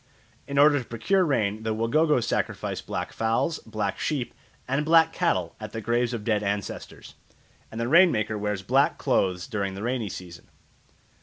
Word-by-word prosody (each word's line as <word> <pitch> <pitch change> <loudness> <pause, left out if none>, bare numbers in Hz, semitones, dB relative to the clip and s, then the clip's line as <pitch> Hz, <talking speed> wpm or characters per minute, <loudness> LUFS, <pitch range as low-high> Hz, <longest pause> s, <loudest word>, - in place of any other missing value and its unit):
In 140 - -4
order 145 0 +6
to 125 - -7
procure 185 - +1
rain 110 - 0
the 110 -1 -2
Wagogo 135 +4 +2
sacrifice - - -2
black - - -5
fowls, 115 +8 0
black 105 -3 -4
sheep, 140 -6 -2 0.3
and 135 +3 0
black 160 +1 +4
cattle 90 -3 0
at 110 -1 -8
the 115 - -3
graves 120 +2 0
of 115 -3 -4
dead 105 -2 +1
ancestors, 100 -1 -5 0.6
and 110 - -6
the 115 - -1
rain 170 +6 +6
maker 110 0 -1
wears 105 -2 -3
black - - +2
clothes 90 -1 0
during 100 -5 -3
the 100 - -6
rainy 120 -3 -2
season. 90 -1 -9
115 Hz, 170 wpm, -26 LUFS, 105-140 Hz, 0.6 s, order